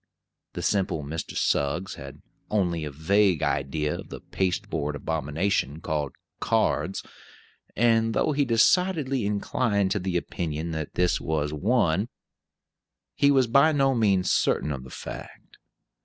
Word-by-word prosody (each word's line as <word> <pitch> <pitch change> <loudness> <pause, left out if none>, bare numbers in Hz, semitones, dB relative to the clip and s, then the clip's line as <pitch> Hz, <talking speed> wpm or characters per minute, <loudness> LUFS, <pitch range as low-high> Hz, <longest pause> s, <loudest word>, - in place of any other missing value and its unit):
The - - -5
simple 95 -6 0
Mr. 80 +2 -5
Suggs 85 +7 0
had - - -10 0.3
only 90 -6 0
a - - -4
vague 90 +5 +2
idea 75 +2 -1
of - - -10
the - - -7
pasteboard 80 -5 -2
abomination 80 +1 -1
called 75 -4 -2 0.3
cards; - - 0 0.7
and 115 -1 +3
though - - +2
he 145 0 +2
decidedly 135 - +2
inclined 100 -1 0
to 105 - +1
the 90 -1 -1
opinion 80 -1 -3
that 80 -2 -5
this 90 0 +2
was 75 -2 -1
one, 100 - +1 1.0
he 140 - +3
was 135 -2 +4
by 140 +7 +5
no 135 -2 +3
means 100 -6 +2
certain 75 - +1
of 65 -3 -5
the - - -11
fact. - - -9
90 Hz, 135 wpm, -26 LUFS, 75-115 Hz, 1.0 s, by